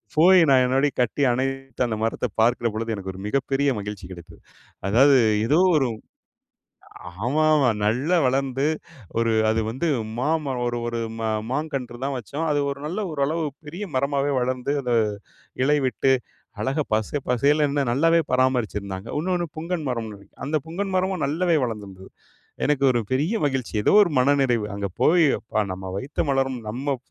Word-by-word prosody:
போய் 180 +4 +7
நான் 130 -1 +5
என்னோடைய 135 +3 +2
கட்டி 125 +4 -1
அணைத்து, 135 +1 -3
அந்த 110 - -2
மரத்தை 115 +2 -1
பார்க்கிற 120 +1 +2
பொழுது, 115 +1 -3
எனக்கு 95 -2 -6
ஒரு 95 - -10
மிகப்பெரிய 135 +3 0
மகிழ்ச்சி 100 -2 -6
கிடைத்தது. 85 -2 -12 0.5
அதாவது 135 +6 +5 0.3
ஏதோ 150 +8 +3 0.2
ஒரு 135 -4 +2 1.4
ஆமாமா 150 0 +3 0.2
நல்லா 135 +12 +2
வளர்ந்து 135 +1 0 0.5
ஒரு 115 0 +2 0.2
அது 110 0 +1
வந்து 130 +9 -2 0.3
மாமரம் 140 -2 -1
ஒரு 120 0 -1
ஒரு 120 0 -3 0.2
மா 110 -1 -1 0.2
மாங்கன்று 135 -4 -3
தான் 140 +1 -1
வச்சோம். 140 +6 -4
அது 145 - +1
ஒரு 140 0 -5
நல்ல 175 +7 -3
ஓரளவு 155 +3 -1 0.2
பெரிய 170 +7 -6
மரமாவே 140 +1 +1
வளர்ந்து 125 +2 -1
அத 125 - -3 0.7
இலை 150 +2 +3
விட்டு, 135 +1 +1 0.5
அழகா 140 +3 0
பச 110 -1 0 0.2
பசேலுன்னு 145 +3 +2
நல்லாவே 165 +6 +3
பராமரிச்சுருந்தாங்க. 110 -6 0
இன்னொண்ணு 175 +1 -1
புங்கன் 165 +1 -3
மரம்னு 115 -3 -3
நினைக்கிறேன். 100 0 -17
அந்த 155 +2 0
புங்கன் 195 +4 -3
மரமும் 185 -2 0
நல்லாவே 165 +3 +1
வளர்ந்திருந்தது. 100 -5 -6 0.6
எனக்கு 145 -2 +1
ஒரு 120 - +1
பெரிய 150 - +1
மகிழ்ச்சி, 135 -5 -2
ஏதோ - - +3
ஒரு 175 - -2
மனநிறைவு. 130 -4 +2
அங்க 100 0 -2
போய், 170 0 +5
"அப்பா. 110 - -3
நம்ம 95 0 -6
வைத்த 135 +11 -2
மலரும் 135 -2 0
நம்ம 135 +5 -2
135 Hz, 150 wpm, -23 LUFS, 120-150 Hz, 1.4 s, போய்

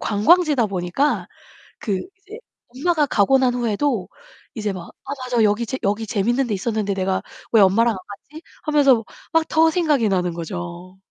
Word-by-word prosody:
관광지다 275 - +3
보니까 190 +9 -1 0.5
그 195 -4 -2 0.2
이제 415 +3 -12 0.3
엄마가 300 +5 0
가고 265 +2 +3
난 255 -2 +2
후에도 235 -2 -1 0.5
이제 215 -4 -2
막 180 -2 -8 0.2
'아, 280 - -6
맞아, 245 -3 +1
여기 210 +3 +1
재 260 +3 -4
여기 205 +3 0
재밌는 240 +6 0
데 215 - -1
있었는데 205 0 -2
내가 190 0 -1 0.3
왜 225 - +6
엄마랑 225 +5 +4
안 190 - -6
갔지?' 295 +11 -12 0.2
하면서 275 -7 +3 0.3
막 325 0 +2
더 320 0 +4
생각이 305 - +1
나는 180 -2 0
거죠. 175 +1 -7
225 Hz, 320 characters per minute, -21 LUFS, 195-280 Hz, 0.5 s, 왜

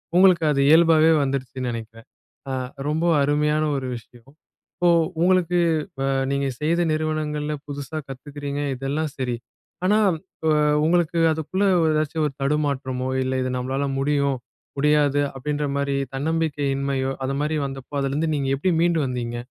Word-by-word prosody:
உங்களுக்கு 180 -3 +6
அது 140 - 0
இயல்பாவே 160 0 +6
வந்துருச்சுன்னு 130 -2 -3
நினைக்கிறேன். 115 0 -8 0.4
அ - - -2 0.3
ரொம்ப 160 +3 0 0.2
அருமையான 150 +2 +2
ஒரு 130 -1 -4
விஷயம். 120 +4 -17 0.9
உங்களுக்கு 180 -1 +3 0.7
நீங்கச் 140 -3 -1
செய்த 170 +3 +1
நிறுவனங்கள்ல 155 -1 -2 0.2
புதுசா 145 +2 -5
கத்துக்குறீங்க. 145 +1 -6 0.2
இதெல்லாம் 145 +4 -2
சரி. 125 -2 -1 0.5
ஆனா 210 +3 +4 0.9
உங்களுக்கு 170 0 +2
அதுக்குள்ள 160 +6 -1 0.3
ஏதாச்சு 155 +1 -1
ஒரு 140 - -3
தடுமாற்றமோ 135 -3 -1
இல்ல 130 0 -1
இது 130 - -1
நம்மளால 135 +3 -1
முடியும் 140 -1 +1 0.4
முடியாது 145 -1 +3
அப்படின்ற 145 +2 -3
மாதிரி 140 0 0 0.2
தன்னம்பிக்கையின்மையோ 140 -3 -1
அது 135 +1 -1
மாதிரி 155 +1 0
வந்தப்போ 135 +1 -9
அதுல 135 0 -1
இருந்து 155 +2 0
நீங்க 135 -1 -1
எப்படி 180 +6 +1
மீண்டு 170 -1 +2
வந்தீங்க? 120 -2 -3
145 Hz, 125 wpm, -23 LUFS, 135-155 Hz, 0.9 s, உங்களுக்கு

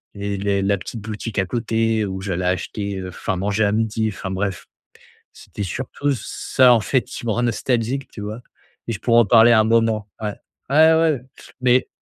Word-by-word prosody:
et 100 0 -3
les 100 0 0
la 100 +1 +2
petite 110 +4 -7
boutique 110 +1 -6
à 95 - +1
côté 115 -1 0
où 95 0 -5
j'allais 95 -2 -2
acheter, 95 +3 -2
heu, 95 0 -6
enfin 95 +1 -3
manger 105 +3 0
à 100 - +1
midi», 110 0 0
enfin 95 -1 -6
bref. 95 0 -3 0.7
C'était 100 - -8
surtout 130 +8 -3
ç 125 -6 -2
ça 125 -1 +3
en 115 - +3
fait 130 +3 +1
qui - - -9
me - - +1
rend 120 +3 0
nostalgique, 120 +2 -1
tu - - -10
vois? 105 +3 -6 0.5
Et - - -2
je 100 - -6
pourrais 120 -1 +4
en - - +2
parler 115 +3 +6
un 110 -1 +5
moment 110 -2 +1
ouais. 105 -1 -3 0.3
Ouais, 160 +3 +6
ouais, 160 -5 +2 0.4
mais 125 0 +3
110 Hz, 200 wpm, -21 LUFS, 100-120 Hz, 0.7 s, parler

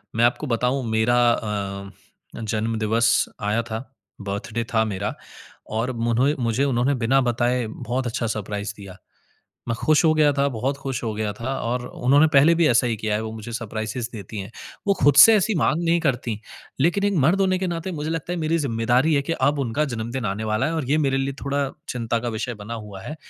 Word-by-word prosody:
मैं 120 +1 +4
आपको 130 +4 0
बताऊँ 125 +3 0
मेरा 110 +2 +2
अ, 100 -3 -3 0.5
जन्म 110 +1 -1
दिवस 115 +2 +2 0.2
आया 105 +3 +1
था, 110 -1 -4 0.4
बर्थडे 105 +4 -3
था 110 0 +4
मेरा 100 0 -3 0.6
और 115 +4 -1
मुने 120 +5 +1
मुझे 115 +4 +1
उन्होंने 130 0 +1
बिना 125 +3 +2
बताए 120 0 0
बहुत 120 +3 -3
अच्छा 115 -1 -2
सरप्राइज़ 105 -1 -4
दिया। 100 -2 -11 0.7
मैं 115 - 0
खुश 155 +6 +3
हो 160 - +5
गया 150 -2 +4
था, 140 0 +1
बहुत 130 +3 -2
खुश 135 -3 -4
हो 110 - -1
गया 105 -1 -2
था। 130 +5 -4
और 125 +1 -2
उन्होंने 140 +6 +3
पहले 150 +5 +6
भी 165 -1 +3
ऐसा 120 +1 +3
ही 115 -2 -1
किया 105 0 -2
है, 110 - -1
वो 110 0 -5
मुझे 110 +1 -8
सरप्राइसेस 115 0 -4
देतीं 105 0 -7
हैं। 100 +3 -8 0.4
वो 200 - +4
खुद 145 -1 +5
से 220 +10 +10
ऐसी 205 +2 +1
माँग 160 +1 +1
नहीं 170 0 +2
करतीं, 120 -7 -1 0.4
लेकिन 175 +7 +2
एक 205 -1 +2
मर्द 185 +6 +3
होने 185 -1 +2
के 190 - -1
नाते 170 +2 -4
मुझे 155 0 -4
लगता 165 +2 -3
है 175 - -2
मेरी 160 +1 +1
जिम्मेदारी 125 +3 +1
है 140 - +2
कि 165 - -3
अब 145 -1 +1
उनका 135 +4 0
जन्मदिन 120 -1 -4
आने 105 +2 -3
वाला 110 +5 0
है, 165 - -2
और 155 -4 -1
ये 155 - +3
मेरे 135 -3 +1
लिए 135 +1 -1
थोड़ा 140 -1 -1 0.2
चिंता 115 -1 -1
का 120 +1 -3
विषय 115 +2 -3
बना 105 +2 -7
हुआ 105 -3 -8
है 150 - -7
120 Hz, 210 wpm, -23 LUFS, 110-145 Hz, 0.7 s, से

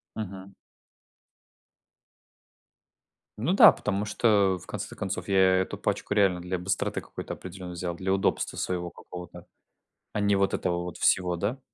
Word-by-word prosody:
Мгм. 95 -2 -7 2.8
Ну 130 +12 0
да, - - +9
потому 105 0 -2
что, 105 -3 +3
э, - - -12
в - - -15
конце - - -5
то - - -10
концов, 95 -1 -4
я 95 -1 +3 0.2
эту 95 0 -1
пачку - - -2
реально 100 -4 +3
для 90 +1 -3
быстроты 95 +1 -1
какой-то - - -7
определенной 90 -1 -8
взял, 85 0 -4
для 95 +2 -1
удобства 95 - 0
своего 90 -1 -2
какого-то, 90 -1 -10 0.7
а 105 - 0
не 100 0 +3
вот 100 0 +1
этого 85 -1 -1
вот 90 -2 -6
всего, 90 -1 +2
да? 105 +10 -2
95 Hz, 155 wpm, -27 LUFS, 90-100 Hz, 2.8 s, да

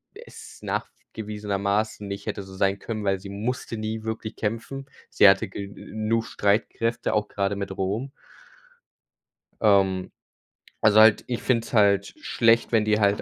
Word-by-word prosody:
d - - -11
es - - -12
nachgewiesenermaßen 105 -1 -3
nicht 100 0 -6
hätte 100 - -3
so 95 0 -12
sein 95 +1 +1
können, 110 0 -5
weil 95 -1 +1
sie 100 +1 -10
musste 115 +4 -4
nie 110 0 -4
wirklich 110 0 -5
kämpfen. 115 +5 -4 0.2
Sie 105 - +6
hatte 95 -1 +2
genug 110 +3 -3
Streitkräfte, 115 +3 0
auch 105 -1 +1
grade 100 0 -1
mit 100 -1 -4
Rom. 105 +8 -2 1.5
Ähm, 95 -3 +3 0.7
also 110 0 +6
halt 110 -1 +6
ich 120 -2 -3
finde 115 -3 +1
es - - -12
halt 100 -2 +3
schlecht, 115 0 +2
wenn 110 -2 +3
die 105 0 +2
halt 100 0 +2
105 Hz, 150 wpm, -25 LUFS, 100-110 Hz, 1.5 s, Sie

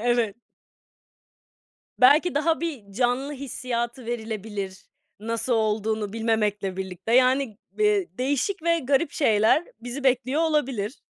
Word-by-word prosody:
Evet. 240 -4 +1 1.6
Belki 290 +6 +6
daha 320 +2 +1
bir 265 -13 -5
canlı 250 +5 0
hissiyatı 250 -3 -4
verilebilir, 215 -4 -5 0.4
nasıl 230 +3 -2
olduğunu 215 -2 0
bilmemekle 210 -4 0
birlikte. 190 +3 -3
Yani, 255 -3 +3 0.2
ııı, 420 -1 +4 0.2
değişik 285 +9 -1
ve 335 0 +2
garip 280 +2 +1
şeyler 220 +3 +3 0.2
bizi 245 +4 -6
bekliyor 260 +3 +2
olabilir. 270 -8 0
245 Hz, 110 wpm, -25 LUFS, 220-280 Hz, 1.6 s, Belki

